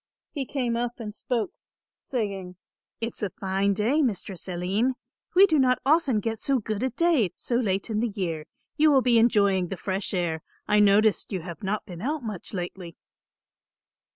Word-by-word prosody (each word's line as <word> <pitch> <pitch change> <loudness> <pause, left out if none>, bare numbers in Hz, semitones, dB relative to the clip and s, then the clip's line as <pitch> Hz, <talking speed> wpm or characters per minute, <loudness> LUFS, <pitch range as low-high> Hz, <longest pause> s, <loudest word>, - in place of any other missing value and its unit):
He 275 -4 -4
came 245 -4 -1
up 240 0 -1
and 210 -2 -6
spoke, 235 0 -2 0.5
saying, 195 -7 -4 0.5
"It's 230 +1 -4
a 205 - 0
fine 195 +1 0
day, 235 +9 +2
Mistress 200 - -2
Aline; 190 +8 0 0.4
we 385 +2 +9
do 315 -6 +2
not 255 -1 +4
often 280 -6 +3
get 225 +1 -2
so 275 -1 +1
good 215 -2 -3
a 260 - +1
day 305 - +2
so - - -5
late 200 -5 0
in 215 - 0
the 235 +1 0
year. 170 -7 -3 0.3
You 310 0 +5
will 270 -3 +4
be 240 -2 +5
enjoying 200 -5 +3
the 190 - -5
fresh 190 +2 -2
air. 165 -3 -1 0.3
I 210 - +4
noticed 210 +2 +4
you 190 -3 -2
have 170 -2 -8
not 205 +2 -2
been 175 -3 -9
out 295 +3 -2
much 210 -6 -4
lately." 175 -2 -6
210 Hz, 180 wpm, -26 LUFS, 190-250 Hz, 0.5 s, we